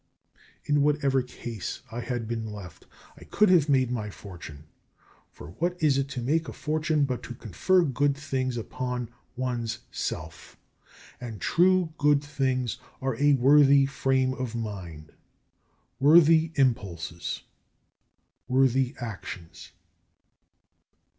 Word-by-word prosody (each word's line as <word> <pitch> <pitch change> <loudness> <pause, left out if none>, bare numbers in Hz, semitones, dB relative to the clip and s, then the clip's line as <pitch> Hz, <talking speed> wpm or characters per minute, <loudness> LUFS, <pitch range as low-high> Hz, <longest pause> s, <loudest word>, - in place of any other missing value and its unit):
In 145 0 +2
whatever 140 -2 +2
case 120 -1 -7
I 120 - -5
had 120 -2 -3
been 110 -2 -4
left 100 -4 -10 0.3
I - - -13
could 210 -1 +2
have 160 -5 +4
made 130 -3 +3
my 110 -4 -3
fortune: 85 -7 -10 0.7
for 75 - -11
what 175 +1 0
is 145 -4 +3
it 135 - -1
to 125 -3 -5
make 160 +6 +1
a - - -6
fortune 155 -1 0
but 125 -2 -3
to 125 - -8
confer 175 - +1
good 145 -1 +1
things 130 -3 -2
upon 125 +1 -4 0.3
one's 120 -3 -2
self; 80 0 -6 0.6
and 115 -4 -7
true 180 - +3
good 145 -1 +3
things 130 -4 -1 0.2
are 135 -2 -1
a 145 +1 +4
worthy 140 +1 +6
frame 135 -1 +1
of 130 -3 -4
mind, 90 -9 -6 0.9
worthy 160 +2 +6
impulses, 95 - -1 1.0
worthy 130 0 +2
actions. 95 -7 -8
130 Hz, 120 wpm, -27 LUFS, 115-145 Hz, 1.0 s, worthy